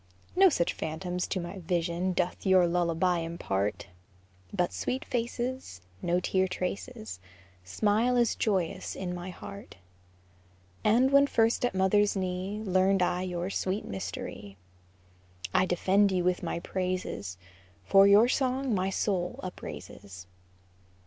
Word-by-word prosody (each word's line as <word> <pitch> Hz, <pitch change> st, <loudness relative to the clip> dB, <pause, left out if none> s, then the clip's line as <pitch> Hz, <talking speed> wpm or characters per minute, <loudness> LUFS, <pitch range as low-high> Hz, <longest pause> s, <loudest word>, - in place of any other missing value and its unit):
No 385 Hz, +1 st, +7 dB
such 170 Hz, -, 0 dB
phantoms 175 Hz, +3 st, -3 dB
to 190 Hz, -, -2 dB
my 175 Hz, +3 st, -6 dB
vision 175 Hz, +1 st, -1 dB
Doth 180 Hz, 0 st, -1 dB
your 190 Hz, -2 st, +5 dB
lullaby 175 Hz, 0 st, +1 dB
impart, 105 Hz, -, -2 dB, 0.7 s
But 175 Hz, -1 st, 0 dB
sweet 260 Hz, +1 st, -3 dB
faces, 240 Hz, -, -3 dB, 0.2 s
No 175 Hz, +1 st, +1 dB
tear 190 Hz, +1 st, +1 dB
traces, 180 Hz, -, -5 dB, 0.4 s
Smile 215 Hz, -, +1 dB
as 240 Hz, -2 st, +3 dB
joyous 190 Hz, -3 st, -1 dB
in 180 Hz, -2 st, -4 dB
my 175 Hz, +1 st, -6 dB
heart, 100 Hz, -, -10 dB, 1.1 s
As 245 Hz, +5 st, +4 dB
when 280 Hz, 0 st, +6 dB
first 230 Hz, -2 st, +2 dB
at 245 Hz, -5 st, 0 dB
mother's 200 Hz, +2 st, +3 dB
knee 190 Hz, +2 st, -3 dB
Learned 190 Hz, -1 st, +3 dB
I 180 Hz, 0 st, 0 dB
your 180 Hz, 0 st, -3 dB
sweet 195 Hz, +2 st, -2 dB
mystery. 100 Hz, +1 st, -6 dB, 1.0 s
I 185 Hz, -, +3 dB
defend 190 Hz, +3 st, +3 dB
you 180 Hz, -1 st, +1 dB
with 180 Hz, 0 st, +1 dB
my 170 Hz, -1 st, -3 dB
praises, 180 Hz, -, -3 dB, 0.5 s
For 195 Hz, -, +6 dB
your 205 Hz, +4 st, +7 dB
song 260 Hz, -1 st, 0 dB
my 190 Hz, -1 st, +1 dB
soul 185 Hz, -2 st, -1 dB
upraises. 100 Hz, -, -8 dB
185 Hz, 130 wpm, -29 LUFS, 175-205 Hz, 1.1 s, No